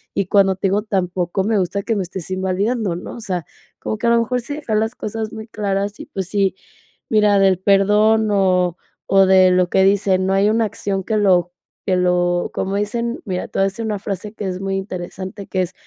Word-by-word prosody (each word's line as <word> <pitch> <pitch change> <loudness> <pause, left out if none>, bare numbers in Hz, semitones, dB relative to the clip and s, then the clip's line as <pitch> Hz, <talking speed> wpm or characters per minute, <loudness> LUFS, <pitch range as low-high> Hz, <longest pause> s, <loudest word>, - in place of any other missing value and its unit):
y 195 - +1
cuando 195 0 +3
te 190 - -1
digo, 200 +2 +1
tampoco 185 -3 -1
me 215 +1 +1
gusta 190 +2 -2
que 225 - -1
me 200 - 0
estés 180 -1 -7
invalidando", 190 +2 -1
¿no?, 175 - -7
o 235 - -9
sea, 180 -6 -3 0.3
como 215 - -4
que 235 - 0
a - - +5
lo 235 0 +4
mejor, 250 +2 -1
sí 285 +5 -6
dejar 285 -8 -3
las 220 +3 -1
cosas 220 0 -4
muy 220 0 -8
claras 200 -1 -2
y, - - -9
pues, 190 -2 -4
sí, 195 -2 +1 0.5
mira, 210 -2 +4
del 190 -2 +3
perdón 210 +3 +3
o 185 -3 +2 0.4
o 195 0 +6
de 185 -1 +6
lo 180 -1 +2
que 190 - +4
dicen, 195 -1 +2
no 190 - +1
hay 195 +2 +3
una 225 0 +2
acción 195 -2 -3
que 215 +3 -1
lo 180 -4 +3 0.3
que 185 - +1
lo, 175 -1 +1
¿cómo 195 +1 -2
dicen? 235 +4 -2
mira, 185 -3 -3
te - - -8
voy - - +4
a - - +4
decir 195 +4 -7
una 215 -1 -1
frase 200 +1 -5
que 210 -3 -5
es 185 -1 -4
muy 195 0 -2
interesante, 190 +1 -6
que 185 - -1
es: 180 +1 -6
195 Hz, 225 wpm, -19 LUFS, 185-215 Hz, 0.5 s, o